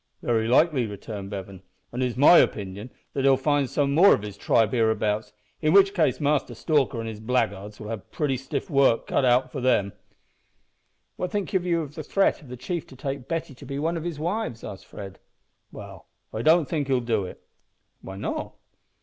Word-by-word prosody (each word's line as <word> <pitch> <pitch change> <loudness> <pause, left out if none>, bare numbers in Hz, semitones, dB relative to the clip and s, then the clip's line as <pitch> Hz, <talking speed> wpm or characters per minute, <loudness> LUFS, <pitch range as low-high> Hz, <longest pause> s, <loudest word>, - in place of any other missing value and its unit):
"Very 115 -2 +1
likely," 130 -1 +3
returned 100 -1 -7
Bevan; 95 -2 -7 0.3
"an' 125 - -3
it's 125 -1 -1
my 150 +6 +8
opinion 100 +3 -1 0.2
that 135 - -1
he'll 135 -1 +5
find 145 -1 +1
some 140 +1 0
more 185 +7 +7
of - - -7
his 105 -2 -7
tribe 110 +1 +2
hereabouts, 110 -3 0 0.3
in 155 0 +2
which 195 0 +6
case 170 -6 +1
Master 145 -4 0
Stalker 140 -3 +1
and 115 - -4
his 110 -2 -6
blackguards 105 -3 -2
will 105 - -7
have 110 -3 -6
pretty 145 -4 -1
stiff 130 +1 -4
work 135 -6 +3
cut - - 0
out 125 +1 +3
for 135 - -5
them." 105 -6 +2 1.2
"What 180 - -2
think 205 -2 -3
you 175 -3 +1
of 145 -1 -9
the 160 - -6
threat 195 +6 +1
of 145 - -15
the 125 0 -8
chief 170 +6 -4
to 130 - -14
take 135 0 -5
Betty 165 -3 -3
to 135 - -14
be 140 0 -4
one 160 +4 -1
of 165 - -4
his 170 -3 -4
wives?" 170 - -3
asked 95 - -9
Fred. 95 -2 -9 0.5
"Well, - - -11 0.3
I 110 - -3
don't 160 +3 +4
think 145 -2 -2
he'll 130 -2 +2
do 115 -5 -1
it." - - -9 0.6
"Why 95 - -8
not?" - - -4
130 Hz, 200 wpm, -25 LUFS, 110-155 Hz, 1.2 s, my